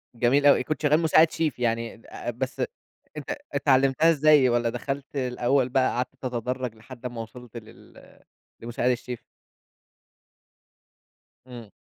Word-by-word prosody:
جميل 125 +5 +2
أوي، 140 -2 +6
كنت 155 +4 -3
شغال 150 +1 +3
مساعد 160 0 +4
شيف 155 -6 -2
يعني 115 -1 -2 0.3
بس 130 +2 -4
ات - - 0 0.5
ات - - -5
اتعلمتها 135 +2 +3
إزاي 150 -3 +5
والّا 120 -1 +1
دخلت 135 +4 -5
الأول 125 0 +1
بقى 130 0 +2
قعدت 125 +2 -3
تتدرج 125 -1 -3
لحد 120 +3 -13
أمَّا 120 -2 -4
وصلت 120 +1 -11
لل 115 +1 -15 0.4
لمساعد 120 +1 -1
الشيف؟ 125 0 -5 2.2
إمم. 120 -4 -10
125 Hz, 125 wpm, -25 LUFS, 120-140 Hz, 2.2 s, أوي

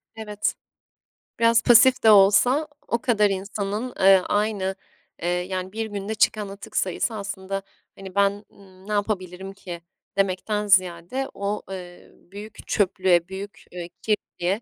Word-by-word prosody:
Evet. 210 -2 -2 0.8
Biraz 230 0 +5
pasif 250 +2 +6
de 220 - +8
olsa 245 +9 +5 0.2
o 235 - 0
kadar 210 -4 +3
insanın, 200 +4 -3
eee, 190 0 +7
aynı, 205 -2 0 0.5
eee, 175 - -2
yani, 185 +1 -2
1 225 +1 -3
günde 205 +1 -4
çıkan 210 -1 +1
atık 200 +1 -8
sayısı 190 +5 0
aslında, 195 -1 -4 0.3
hani, 190 0 -10
ben, 200 +1 +1
ımm, 190 0 -18
ne 210 - -3
yapabilirim 190 -2 -3
ki, 175 -3 -8 0.4
demekten 200 +2 0
ziyade 185 +7 +2
o, 200 +1 -3
eee, 180 -2 -9
büyük 205 +3 -12
çöplüğe, 185 -3 +2
büyük, 195 -1 -8
eee, 175 -1 -7
kirliliğe 205 -1 -1
200 Hz, 135 wpm, -24 LUFS, 190-215 Hz, 0.8 s, de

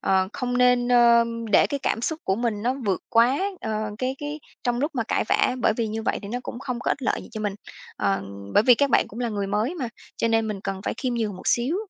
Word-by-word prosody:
ờ, 190 -1 +2
không 245 -2 -2
nên, 250 -1 +4
ơ, 235 -1 +6 0.3
để - - +6
cái 285 - -3
cảm 225 - 0
xúc 315 +5 -1
của 190 - +1
mình 225 -3 -1
nó 250 +2 +1
vượt 190 -3 +1
quá, 240 +3 +4 0.2
ờ, 215 -1 -2
cái, 260 +1 -1
cái, 295 +1 -5 0.2
trong 240 -1 +1
lúc 295 +3 0
mà 240 - 0
cãi - - +1
vã, - - +3
bởi 220 - +3
vì 230 -2 0
như 220 +1 -4
vậy - - 0
thì 200 - -7
nó 245 +4 -2
cũng 240 - -6
không 250 -2 -4
có - - -1
ích 280 - -2
lợi 235 - 0
gì - - -12
cho 215 - -5
mình. 205 -2 -2 0.4
Ờ, 100 0 0 0.3
bởi - - +6
vì 245 +1 +7
các 280 +3 +1
bạn - - +3
cũng 230 - -8
là 240 - 0
người 205 -3 -2
mới 215 - 0
mà, 265 -8 -3 0.3
cho 230 - +1
nên 225 -1 +2
mình 200 -2 -4
cần 195 -1 -4
phải - - -1
khiêm 255 -2 -2
nhường 215 -5 -2
một - - -11
xíu. 250 +8 +2
235 Hz, 270 wpm, -24 LUFS, 215-250 Hz, 0.4 s, vì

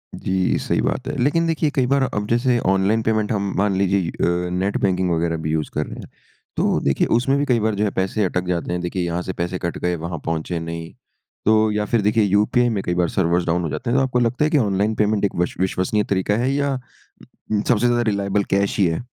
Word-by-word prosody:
जी, 95 -1 0
सही - - 0
बात - - -2
हैं। - - -3
लेकिन 165 +4 +2
देखिए 160 -2 +1
कई 130 -3 +2
बार 140 +1 +2
अब 105 0 -1
जैसे 120 +2 +2
ऑनलाइन 95 +3 +2
पेमेंट 110 -1 0
हम 100 -2 -1
मान 100 0 +1
लीजिए 95 -2 +1
अ, 90 +1 -1
नेट 95 +3 0
बैंकिंग 90 -2 +1
वगैरह 80 0 0
भी 75 - -1
यूज़ 80 -1 -1
कर 75 - -1
रहे - - -9
हैं। - - -10 0.5
तो - - +2
देखिए 70 - +2
उसमें 135 +3 +1
भी 145 - +1
कई 120 -4 +2
बार 110 0 0
जो 105 - 0
है 105 - +2
पैसे 95 +3 0
अटक 90 0 -1
जाते 85 -1 -2
हैं। 90 0 -2
देखिए 90 +1 -2
यहाँ 85 +1 -2
से 95 - -4
पैसे 85 +2 -3
कट 85 - -3
गए 90 0 -1
वहाँ 85 -1 -5
पहुँचे 80 +1 -2
नहीं। 85 0 -6 0.5
तो 110 0 +4
या 105 0 -1
फिर 115 -1 +1
देखिए 105 +2 +2
यूपीआई 105 +5 +2
में 100 -4 -1
कई 90 - -1
बार 90 -1 +1
सर्वर्स 85 -1 +1
डाउन 85 +1 +1
हो 80 - -2
जाते 120 - -4
हैं। 130 - +2
तो - - +3
आपको 125 -2 0
लगता 120 +4 +1
है - - +1
कि 150 - +4
ऑनलाइन 105 -2 +1
पेमेंट 105 -1 +1
एक 100 - -2
वश 90 0 -1
विश्वसनीय 95 +3 0
तरीका 100 +1 +1
हैं 125 +3 +1
या 140 -1 0 0.9
सबसे 120 -1 +2
ज्यादा 120 0 +2
रिलाएबल 100 0 0
कैश 100 +1 +1
ही 95 - +5
हैं? 80 +9 -3
100 Hz, 240 wpm, -21 LUFS, 90-115 Hz, 0.9 s, ही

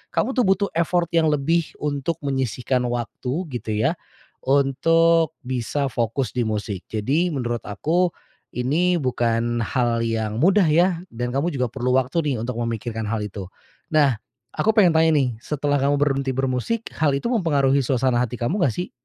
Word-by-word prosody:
kamu - - +1
tuh 250 - +3
butuh 195 +1 +2
effort 170 +1 +1
yang 165 -2 +3
lebih 155 +3 +1 0.2
untuk 145 +2 -1
menyisihkan 130 -2 -1
waktu, 120 +1 -3 0.2
gitu 115 -3 -4
ya, 110 - +2 0.5
untuk 160 +4 +3
bisa 130 +3 -2
fokus 120 +1 -1
di 125 - +1
musik. 105 -3 -3
Jadi, 140 - 0
menurut 120 -5 -3
aku, 170 - 0 0.4
ini 165 +8 +1
bukan 120 -2 0
hal 120 0 0
yang 110 -2 -2
mudah 190 +5 +4
ya? 170 +3 +3
Dan 120 +1 -4
kamu 140 +5 0
juga 125 -2 0
perlu 125 +1 0
waktu 130 +5 +1
nih - - 0
untuk 125 0 -4
memikirkan 115 -1 -3
hal 110 0 -2
itu. 100 -2 -7 0.4
Nah, 145 -5 +4 0.4
aku 220 - +2
pengen 190 -7 +5
tanya 160 0 +5
nih, 135 -4 +2
setelah 145 -1 -1
kamu 140 +1 +2
berhenti 135 -2 +1
bermusik, 135 - -2
hal 145 -3 +1
itu 140 - -3
mempengaruhi 140 - +2
suasana 125 -1 +1
hati 125 0 -4
kamu 165 - -1
nggak 130 - +2
sih? 180 - -4
135 Hz, 165 wpm, -22 LUFS, 120-160 Hz, 0.5 s, pengen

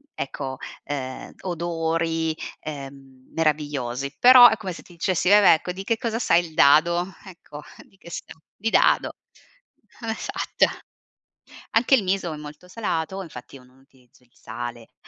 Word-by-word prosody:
ecco, 135 -1 -5 0.3
ehm, 130 -2 -6
odori, 165 -2 -1 0.3
ehm, 135 -3 -10
meravigliosi, 145 -4 -1
però 250 0 +9
è 220 - +2
come 195 -4 -6
se 170 - -10
ti 175 - -17
dicessi: 180 +1 -1
"Vabbè, 205 -2 +7
ecco, 180 +3 -5
di 190 +2 -7
che 230 +3 0
cosa 225 -2 -2
sai 175 -7 +2
il 160 - -12
dado?" 170 +6 +4
Ecco 170 -5 -11 0.3
di 195 - -27
che 170 - -14
sa? - - -6 0.3
Di 225 +3 -2
dado - - +3 0.9
Esatto. 225 -1 -1 1.1
Anche 235 +4 +4
il 250 - +4
miso 185 -3 -1
è - - -6
molto 150 +4 -11
salato, 190 -3 -3
infatti 140 -5 -11
non 125 -1 -19
utilizzo 130 -2 -26
il 125 - -29
sale. 120 0 -8
165 Hz, 145 wpm, -24 LUFS, 140-190 Hz, 1.1 s, però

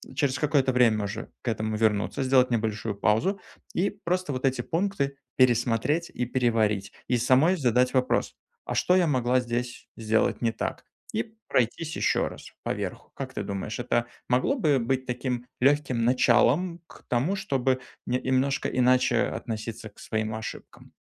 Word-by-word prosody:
через 140 -2 +1
какое-то 140 -3 +2
время 115 -4 +3
уже 105 +3 -6
к - - -13
этому 110 -1 -1
вернуться, 105 +3 +1
сделать 130 -1 +4
небольшую 110 -1 -1
паузу. 130 - +1 0.3
И 190 +3 +1
просто 185 -6 -2
вот 130 +1 -2
эти 130 0 +1
пункты 165 -6 -1 0.2
пересмотреть 125 +6 +2
и 125 - -2
переварить, 110 -5 +1 0.2
и 125 - +2
самой 130 +9 +4
задать 125 -2 +2
вопрос: 130 -1 +1 0.3
"А - - -3
что 180 - +3
я 180 -3 +4
могла 130 -2 +2
здесь 120 0 -4
сделать 110 0 +1
не 115 -2 +2
так?" - - -4 0.3
И 115 - -3
пройтись 135 +7 0
еще - - +1
раз - - -10
поверху. - - -4
Как - - -6
ты - - -3
думаешь, 100 +3 -4
это 120 -1 0 0.2
могло 125 - +2
бы 155 - +2
быть 130 +2 -1
таким 125 0 -3
легким 135 -4 +2
началом 130 +8 +3
к - - -16
тому, 135 +11 +1
чтобы 135 -9 0 0.2
не 125 +1 0
немножко 130 +1 +1
иначе 125 0 +3
относиться 110 0 -5
к 100 - -31
своим 110 0 -2
ошибкам? 110 - -9
125 Hz, 155 wpm, -27 LUFS, 115-140 Hz, 0.3 s, сделать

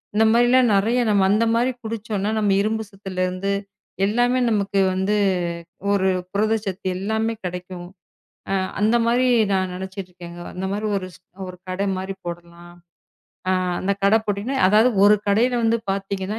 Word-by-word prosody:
இந்த 220 - +4
மாரி 240 +1 +4
எல்லாம் 250 -3 +4
நிறைய 225 +5 +2
நம்ம 200 -2 +3
அந்த 220 +2 +3
மாதிரி 245 +2 +2
குடிச்சோம்னா 215 -2 -3
நம்ம 205 -2 +2
இரும்பு 220 +1 -1
சத்துல 190 -2 -4
இருந்து 185 +2 -2 0.5
எல்லாமே 245 +4 +2
நமக்கு 200 -2 0
வந்து 190 +3 0 0.8
ஒரு 190 -1 +2 0.2
புரதச்சத்து 205 -2 -1
எல்லாமே 220 +3 -1
கிடைக்கும். 180 0 -6 0.6
ஆ - - +1 0.3
அந்த 220 +3 +3
மாரி 245 +2 +3 0.3
நான் 185 -1 0
நினைச்சுக்கிட்டு 190 0 -7
இருக்கேங்க. 175 0 -10
அந்த 190 +1 -3
மாரி 210 +2 -2
ஒரு, 185 - -7 0.4
ஒரு 180 - -9
கடை 195 +2 -1
மாரி 190 +1 -4
போடலாம் 170 0 -9 0.8
ஆ - - +3 0.3
அந்தக் 200 +1 -2
கடை 200 +3 +5
போட்டீங்கன்னா, 210 +6 -2
அதாவது 215 +5 +5 0.2
ஒரு 210 - +7
கடைல 230 +5 +2
வந்து 230 +1 +2
பாத்தீங்கன்னா 195 +2 -3
200 Hz, 150 wpm, -22 LUFS, 190-220 Hz, 0.8 s, ஒரு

